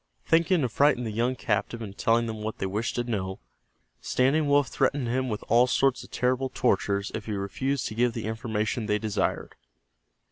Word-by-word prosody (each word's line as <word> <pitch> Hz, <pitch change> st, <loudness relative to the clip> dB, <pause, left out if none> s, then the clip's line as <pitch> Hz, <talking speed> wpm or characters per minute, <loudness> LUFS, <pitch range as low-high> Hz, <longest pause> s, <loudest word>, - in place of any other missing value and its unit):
Thinking 165 Hz, +1 st, +3 dB
to 130 Hz, -, +1 dB
frighten 140 Hz, +1 st, +3 dB
the 110 Hz, -, -3 dB
young 120 Hz, +4 st, 0 dB
captive 115 Hz, 0 st, -1 dB
into 105 Hz, -4 st, -7 dB
telling 115 Hz, +2 st, +2 dB
them 110 Hz, -2 st, -5 dB
what 110 Hz, +1 st, -4 dB
they -, -, -2 dB
wished 105 Hz, +4 st, -2 dB
to 120 Hz, -, 0 dB
know, 95 Hz, -5 st, -3 dB, 0.6 s
Standing 140 Hz, -, +2 dB
Wolf 145 Hz, -1 st, +4 dB
threatened 135 Hz, -4 st, 0 dB
him 130 Hz, +2 st, 0 dB
with 105 Hz, -2 st, -4 dB
all 120 Hz, +2 st, +5 dB
sorts 135 Hz, +1 st, +2 dB
of -, -, -14 dB
terrible 130 Hz, +1 st, 0 dB
tortures 100 Hz, -4 st, 0 dB
if 110 Hz, -, -5 dB
he 110 Hz, -, -2 dB
refused 125 Hz, +8 st, -2 dB
to -, -, -4 dB
give 120 Hz, +1 st, +1 dB
the 115 Hz, -2 st, -4 dB
information 110 Hz, -1 st, -2 dB
they 105 Hz, -1 st, +2 dB
desired. 105 Hz, -1 st, -2 dB
115 Hz, 190 wpm, -27 LUFS, 105-130 Hz, 0.6 s, all